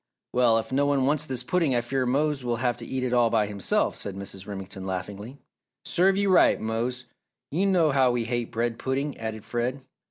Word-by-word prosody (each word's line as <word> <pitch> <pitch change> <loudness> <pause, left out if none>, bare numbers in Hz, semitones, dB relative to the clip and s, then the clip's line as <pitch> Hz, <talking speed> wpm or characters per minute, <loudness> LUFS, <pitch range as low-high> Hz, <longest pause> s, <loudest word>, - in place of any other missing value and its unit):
"Well, 120 -2 +4
if 115 - -3
no 140 +2 +2
one 140 -2 +2
wants 150 +2 +1
this 130 -4 -2
pudding 160 -2 +1
I 120 - +2
fear 130 +1 -1
Mose 145 +1 +1
will 120 -1 0
have 120 0 0
to 120 - -7
eat 130 -1 -2
it 125 -1 -1
all 120 -2 +4
by 110 -2 +2
himself," 100 -1 0
said 100 -2 -5
Mrs. 100 0 -7
Remington, 95 -1 -7
laughingly. 100 +7 -5 0.5
"Serve 190 +2 +3
you 200 -1 +2
right, 185 - +5
Mose, 120 +3 -2 0.5
you 185 +7 +1
know 175 -5 +3
how 135 -2 +4
we 120 -1 0
hate 120 0 -2
bread 115 0 -1
pudding," 135 +2 -2
added 110 -1 -5
Fred. 120 +4 -2
125 Hz, 210 wpm, -26 LUFS, 115-140 Hz, 0.5 s, right